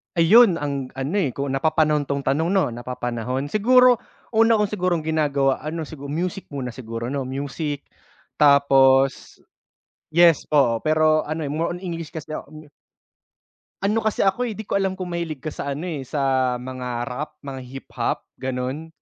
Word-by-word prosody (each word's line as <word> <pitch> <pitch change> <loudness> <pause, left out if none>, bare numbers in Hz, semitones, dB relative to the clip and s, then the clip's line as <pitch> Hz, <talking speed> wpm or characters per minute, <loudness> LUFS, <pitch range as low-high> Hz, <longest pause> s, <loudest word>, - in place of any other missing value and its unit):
Ayun, 185 +4 +6
ang 140 -4 -3
ano 135 +7 -3
eh, 145 -10 -1
kung 140 -1 -2
napapanahon 150 +1 +1
'tong 140 0 -2
tanong, 145 +5 +1
'no, 190 -7 +1
napapanahon. 125 +2 -4
Siguro 250 +3 +5 0.3
una 225 0 +4
kong 210 -2 0
sigurong 180 -5 0
ginagawa 145 -4 +1
ano, 160 +3 -4
sigu 145 -2 -9
music 175 +6 -3
muna 125 -3 -3
siguro, 115 0 -6
'no? 140 -2 -3
Music 145 +2 -4 0.6
tapos 135 -2 +4 0.7
yes, 170 -1 +5
oo. 120 -6 +3
Pero 155 0 +3
ano 155 +1 -3
eh, - - -5
more 160 +3 -1
on - - -10
English 165 -4 -6
kasi 155 -1 -7
ako, - - -9
me 155 -1 -12 1.2
Ano 210 +3 +2
kasi 220 -1 0
ako 245 +6 +1
eh, 220 - -5
'di 220 - -6
ko 200 -1 -1
alam 190 -1 0
kung 185 -2 -6
mahilig 165 -5 -4
ka 155 - -3
sa 140 -1 -4
ano 150 - -6
eh, 155 -7 -4
sa 130 -3 +1
mga 125 0 -6 0.2
rap, 150 +4 -5
mga 135 -1 -6
hip-hop, 135 +2 -4 0.2
ganun. 130 +4 -3
150 Hz, 165 wpm, -23 LUFS, 135-170 Hz, 1.2 s, Ayun